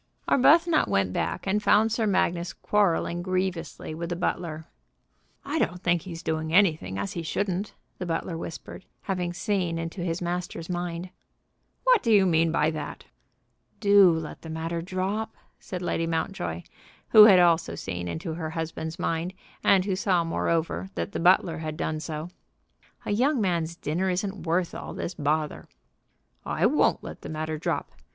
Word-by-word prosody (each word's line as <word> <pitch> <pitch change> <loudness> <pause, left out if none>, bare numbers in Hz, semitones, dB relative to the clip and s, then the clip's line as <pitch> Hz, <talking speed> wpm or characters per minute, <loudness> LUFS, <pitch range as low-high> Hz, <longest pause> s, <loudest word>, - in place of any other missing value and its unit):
Arbuthnot 320 +4 +5
went 95 -2 +1
back, 175 - -2
and 200 +2 +1
found 215 +2 +4
Sir 225 0 +1
Magnus 175 -3 +1
quarrelling 175 -4 +1
grievously 185 -4 -3
with 170 +2 -5
the 175 - -2
butler. 170 -2 -3 0.8
"I - - -1
don't 180 +2 -1
think 170 -1 +2
he's 170 -2 -8
doing 160 0 -2
anything 160 - +3
as 100 0 -3
he 170 - -3
shouldn't," 195 +4 -2 0.2
the 180 - -4
butler 165 +1 -2
whispered, 165 +3 -8 0.2
having 180 -3 -2
seen 180 -3 -1
into 165 +3 -5
his 170 -1 -2
master's 175 -1 -4
mind. 175 0 -4 0.7
"What - - +5
do 230 - +1
you 200 -3 +6
mean 165 -2 +3
by 155 -1 +2
that?" 155 -2 -6 0.7
"Do 200 -3 +7
let 160 -1 -4
the 160 - -9
matter 165 +1 -3
drop," 190 +5 -3 0.2
said 180 -2 -6
Lady 165 -1 -1
Mountjoy, 160 - -2 0.5
who 215 -1 +10
had 200 -4 +8
also 170 -2 +3
seen 90 -2 -5
into 85 - -4
her 160 -1 -4
husband's 160 0 -4
mind, 170 +1 -2 0.3
and 190 -2 +5 0.2
saw, 180 -5 +2
moreover, 165 +2 -1
that - - -3
the - - -3
butler 175 -1 +4
had 155 -1 -5
done 155 -1 -2
so. 155 +2 -5 0.7
"A - - -2
young 260 +6 +2
man's 170 -5 0
dinner 175 +5 -1
isn't 190 0 -3
worth 170 +1 +1
all - - -7
this 175 - -4
bother." 150 -1 -2 0.7
"I - - 0
won't - - +3
let - - -8
the - - -8
matter 155 0 -3
drop. - - -2
170 Hz, 160 wpm, -26 LUFS, 160-190 Hz, 0.8 s, who